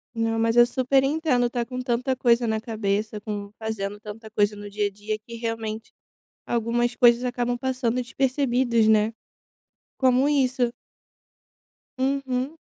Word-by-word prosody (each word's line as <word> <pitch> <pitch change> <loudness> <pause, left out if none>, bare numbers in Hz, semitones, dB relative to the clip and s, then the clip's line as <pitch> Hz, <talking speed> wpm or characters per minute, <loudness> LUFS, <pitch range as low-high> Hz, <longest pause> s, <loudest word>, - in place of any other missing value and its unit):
Não, 225 0 0
mas 225 0 +2
eu 240 0 +8
super 260 +2 +2
entendo 280 -4 +1
estar 240 0 -1
com 250 0 -5
tanta 255 +1 0
coisa 240 -1 +3
na 220 0 0
cabeça, 215 -1 -2
com 205 -1 -5
fazendo 205 -2 -4
tanta 220 +1 -9
coisa 210 -1 +1
no 205 0 -8
dia 205 0 0
a - - -4
dia 210 +2 -5
que 230 +2 -11
realmente 225 -1 -4 0.6
algumas 240 +1 0
coisas 240 0 +5
acabam 245 0 -1
passando 255 -2 -1
despercebidas, 250 -3 +1
né? 215 0 +4 0.9
Como 260 +1 +3
isso. 255 -4 +1 1.3
Uhum. 265 +2 -1
235 Hz, 140 wpm, -25 LUFS, 220-255 Hz, 1.3 s, eu